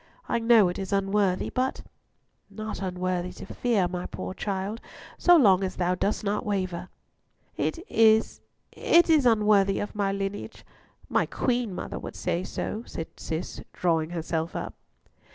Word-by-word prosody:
I - - +1
know 225 -3 +6
it 175 - -3
is 190 -1 -5
unworthy, 195 -1 +1
but—" 260 +1 -1 0.7
"Not 215 -1 -6
unworthy 180 -1 -2
to - - -9
fear, 220 -7 0
my 180 0 -4
poor - - -6
child, 200 +3 -3 0.4
so 350 -1 +7
long 195 - +5
as 185 -1 -3
thou 180 0 +1
dost 200 +4 -1
not 205 0 -1
waver." 185 -3 -2 0.7
"It - - -1
is, 220 0 +3 0.3
it 340 0 +4
is 295 -5 +5
unworthy 210 -3 +4
of 205 - -4
my 200 -2 0
lineage. 195 +1 -5 0.4
My - - +2
mother - - -14
queen 245 -6 0
would - - -6
say 180 0 -1
so," 215 +3 -4
cried 165 - -4
Cis, 160 +2 -4
drawing 165 -3 +1
herself 165 -1 -3
up. - - -4
195 Hz, 155 wpm, -27 LUFS, 180-220 Hz, 0.7 s, so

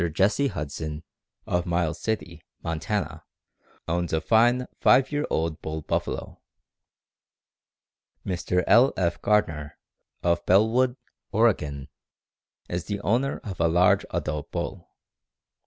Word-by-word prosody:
Jesse 105 - +2
Huston, 75 - -5 0.4
of 90 +1 -1
Miles 85 -2 0
City, 110 -1 -3 0.2
Montana_, 80 -2 -2 0.7
owns 85 0 -1
a 80 - +3
fine 120 +8 +3
five 130 +2 +5
year 145 0 -1
old 80 -1 -1
bull 80 0 -5
buffalo. - - -3 1.8
Mr. 90 -1 0
L. 125 +4 +5
F. 85 -2 0
Gardner, 80 -8 0 0.5
of 85 0 +1
Bellwood, 115 +6 +4 0.4
Oregon, 75 - +1 0.8
is 85 -1 -3
the 100 -1 -3
owner 125 +7 0
of 95 -4 -7
a 85 - +3
large 90 +3 +4
adult 75 -1 -3
bull. - - -5
90 Hz, 110 wpm, -26 LUFS, 80-110 Hz, 1.8 s, five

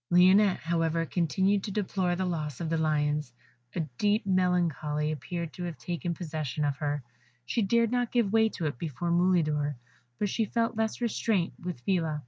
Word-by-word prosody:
Lionette, 185 +3 +6
however, 165 0 0
continued 190 +4 +1
to - - -4
deplore 190 -3 0
the 185 +1 -1
loss 155 -6 -3
of 165 -2 -3
the 165 - +2
Lions: 150 -3 +1 0.4
a - - +1 0.2
deep 210 +1 +2
melancholy 170 -5 +1
appeared 165 +3 -4
to 180 - -6
have 170 -4 -5
taken 170 +6 -3
possession 155 -3 -3
of 140 -1 -1
her; 145 -1 -2 0.4
she 230 - 0
dared 230 +3 +2
not 245 -1 0
give 230 -5 +1
way 220 0 +5
to 170 - -4
it 145 -5 -2
before 170 +2 -3
Mulidor, 155 -5 +2 0.4
but 205 - 0
she 220 +3 0
felt 230 +2 0
less 220 +2 -1
restraint 215 -5 0
with 180 -8 -5
Phila. 165 -3 0
175 Hz, 175 wpm, -29 LUFS, 155-195 Hz, 0.4 s, Lionette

